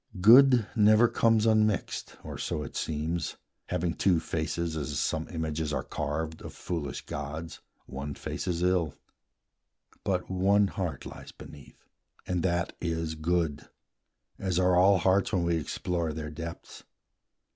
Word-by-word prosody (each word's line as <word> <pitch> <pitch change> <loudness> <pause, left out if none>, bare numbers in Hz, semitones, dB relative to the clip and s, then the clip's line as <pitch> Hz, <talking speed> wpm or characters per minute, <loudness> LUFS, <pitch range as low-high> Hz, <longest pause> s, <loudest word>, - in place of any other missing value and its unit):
Good 120 +3 +7
never 110 +1 +6
comes 115 -1 +3
unmixed, 110 -3 +1
or - - -7
so 75 - -2
it 70 - -9
seems, 80 +2 -2 0.3
Having 90 -1 -1
two 90 -4 +3
faces, 80 +1 -2
as 75 -4 -3
some 80 0 -1
images 80 -2 -3
Are 75 - -1
carved, 80 +2 -4
of - - -9
foolish 80 -6 -4
gods; 80 +3 -6 0.2
one 70 +2 -6
face - - -5
is 85 -1 -1
ill; 90 -4 +1 1.1
But 90 -2 -1
one 100 +2 +3
heart 85 -10 -4
lies - - -9
beneath, 70 -2 -14 0.4
and 90 -1 -1
that 85 -1 0
is 80 -1 -2
good, 80 -1 -1 0.7
As 95 -2 -1
are 90 0 +4
all 95 +2 +6
hearts, 95 +4 +2
when 90 -3 +2
we 85 -1 +1
explore 85 +1 -2
their 75 0 -5
depths. 80 +2 -8
85 Hz, 140 wpm, -29 LUFS, 80-95 Hz, 1.1 s, Good